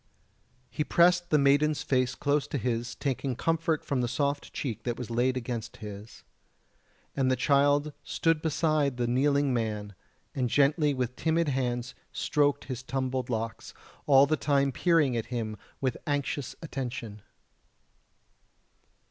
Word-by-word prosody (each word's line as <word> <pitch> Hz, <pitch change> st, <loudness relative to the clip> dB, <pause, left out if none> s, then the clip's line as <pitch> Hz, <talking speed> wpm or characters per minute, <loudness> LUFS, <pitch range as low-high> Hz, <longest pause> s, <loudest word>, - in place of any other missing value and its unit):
He 150 Hz, -, -1 dB
pressed 175 Hz, +2 st, +3 dB
the 155 Hz, -, +4 dB
maiden's 145 Hz, +2 st, +3 dB
face 130 Hz, -4 st, +1 dB
close 145 Hz, 0 st, 0 dB
to -, -, -3 dB
his, 120 Hz, -2 st, -2 dB
taking 135 Hz, -1 st, -2 dB
comfort 165 Hz, +3 st, 0 dB
from 135 Hz, -3 st, 0 dB
the 120 Hz, -, 0 dB
soft 140 Hz, +3 st, -1 dB
cheek 120 Hz, -7 st, -4 dB
that 120 Hz, -1 st, -3 dB
was 125 Hz, -2 st, -6 dB
laid 125 Hz, +2 st, +1 dB
against 120 Hz, -2 st, -5 dB
his. 105 Hz, 0 st, -9 dB, 0.9 s
And 130 Hz, -1 st, +2 dB
the 130 Hz, -, +3 dB
child 145 Hz, +3 st, +2 dB
stood 165 Hz, -2 st, +1 dB
beside 155 Hz, -4 st, +1 dB
the 120 Hz, -, 0 dB
kneeling 140 Hz, +3 st, +2 dB
man, 105 Hz, -3 st, -2 dB, 0.4 s
and 125 Hz, -2 st, -1 dB
gently 145 Hz, +2 st, +3 dB
with 125 Hz, -1 st, -2 dB
timid 165 Hz, +1 st, +1 dB
hands 125 Hz, -2 st, -2 dB, 0.2 s
stroked 145 Hz, -1 st, +1 dB
his 130 Hz, -2 st, -5 dB
tumbled 130 Hz, -1 st, -2 dB
locks, 115 Hz, -1 st, -4 dB, 0.3 s
all 135 Hz, -1 st, +7 dB
the 155 Hz, +2 st, +1 dB
time 140 Hz, -2 st, +2 dB
peering 150 Hz, -3 st, +2 dB
at 115 Hz, -, -2 dB
him 115 Hz, -4 st, -3 dB, 0.2 s
with 130 Hz, -3 st, -1 dB
anxious 145 Hz, -2 st, -2 dB
attention. 120 Hz, -8 st, -5 dB
135 Hz, 140 wpm, -28 LUFS, 120-145 Hz, 0.9 s, all